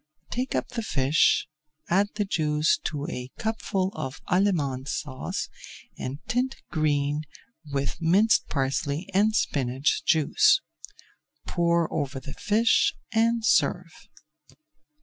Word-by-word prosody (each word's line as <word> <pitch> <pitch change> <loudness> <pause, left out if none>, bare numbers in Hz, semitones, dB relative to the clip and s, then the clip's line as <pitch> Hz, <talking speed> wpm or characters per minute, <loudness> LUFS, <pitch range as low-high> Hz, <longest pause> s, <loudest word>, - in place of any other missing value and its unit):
Take 250 +1 -2
up - - -1
the 245 -2 -3
fish, 145 -6 +2 0.4
add 200 +4 +2
the 210 -1 0
juice 155 -4 +1
to 145 -2 -3
a 125 0 -5
cupful 220 -4 -1
of 130 +1 -5
Allemande 155 -9 +1
Sauce 130 -2 -4 0.5
and 130 +2 -5
tint 250 +3 0 0.2
green 145 -1 +1 0.5
with 140 +4 -2
minced 195 +7 +4
parsley 140 +4 -1
and 210 +3 +3
spinach 135 - 0
juice. 160 -3 +4 0.9
Pour 170 -1 +1
over 140 -3 -2
the 135 +1 -9
fish 220 +2 +2 0.2
and 230 0 +2
serve. 180 -6 +2
165 Hz, 110 wpm, -26 LUFS, 140-205 Hz, 0.9 s, minced